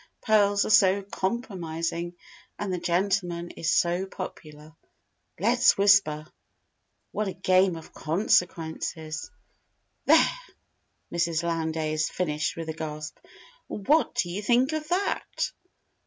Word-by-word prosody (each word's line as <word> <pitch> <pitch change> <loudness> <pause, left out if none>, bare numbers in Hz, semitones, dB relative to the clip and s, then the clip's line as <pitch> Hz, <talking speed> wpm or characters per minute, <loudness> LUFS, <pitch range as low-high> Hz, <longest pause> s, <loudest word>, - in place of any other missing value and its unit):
Pearls 205 -2 +3
are - - -1
so 200 -2 +5
compromising. 175 -5 -3 0.4
And 205 -2 -3
the 180 - -2
gentleman 175 -1 0
is 165 - -3
so 175 +3 +2
popular._ 155 -5 -9 0.6
"Let's - - +4
Whisper: 195 -7 +4 0.9
What 210 0 -2
a 190 - -3
game 185 0 +3
of 160 - -11
Consequences!" 160 -2 -1 0.8
"There!" - - +7 0.9
Mrs. 170 -1 0
Lowndes 160 -2 -1
finished 155 -4 -2
with 165 -1 -6
a - - -2
gasp. 155 -1 -6 0.5
"What 290 +10 +1
do 200 -8 0
you 195 +4 -3
think 245 +6 +2
of 310 -1 -3
that?" 370 +4 -1
175 Hz, 110 wpm, -27 LUFS, 160-200 Hz, 0.9 s, There